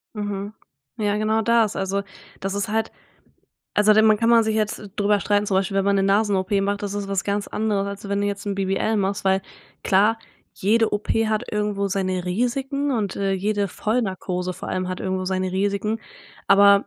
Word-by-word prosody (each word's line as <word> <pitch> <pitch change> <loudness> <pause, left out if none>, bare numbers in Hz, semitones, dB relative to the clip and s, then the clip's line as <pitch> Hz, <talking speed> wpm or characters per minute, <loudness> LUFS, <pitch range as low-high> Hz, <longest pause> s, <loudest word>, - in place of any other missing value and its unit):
Mhm, 205 0 -4 0.4
ja 205 -1 0
genau 215 +1 +1
das. 230 -2 +2
Also, 195 +1 -1 0.4
das 195 0 -3
ist 200 +1 -1
halt 220 +1 -1 0.8
also 210 +1 +5
dann 220 +1 +5
man 215 -1 +5
kann 230 +2 +2
man 230 -1 +6
sich 220 -1 0
jetzt 215 -1 0 0.2
drüber 205 -1 +2
streiten, 205 0 +1
zum 195 - -1
Beispiel 195 +1 0
wenn 195 - +2
man 200 0 +3
'ne 195 - +2
Nasen 200 +1 +2
OP 190 0 -1
macht, 200 +1 -1
das 200 -1 -3
ist 205 -1 -3
was 195 -1 -1
ganz 200 0 -1
anderes 210 -2 -1
als 200 0 -6
wenn 200 0 0
du - - +1
jetzt 200 0 -4
'n 200 - -1
BBL 195 +3 0
machst, 200 0 -1
weil 190 0 +2 0.4
klar, 210 +4 +3 0.4
jede 225 +3 +2
OP 205 - -4 0.2
hat 215 -1 0
irgendwo 210 -1 0
seine 185 -2 -1
Risiken 265 +8 -1
und, 215 -7 -1
äh, 195 -1 0
jede 200 +1 0
Vollnarkose 185 -5 -2
vor - - -8
allem 185 0 -2
hat 185 - -4
irgendwo 185 0 -2
seine 185 0 -1
Risiken, 205 +3 -1 0.5
aber 200 0 +6
200 Hz, 200 wpm, -23 LUFS, 195-215 Hz, 0.8 s, man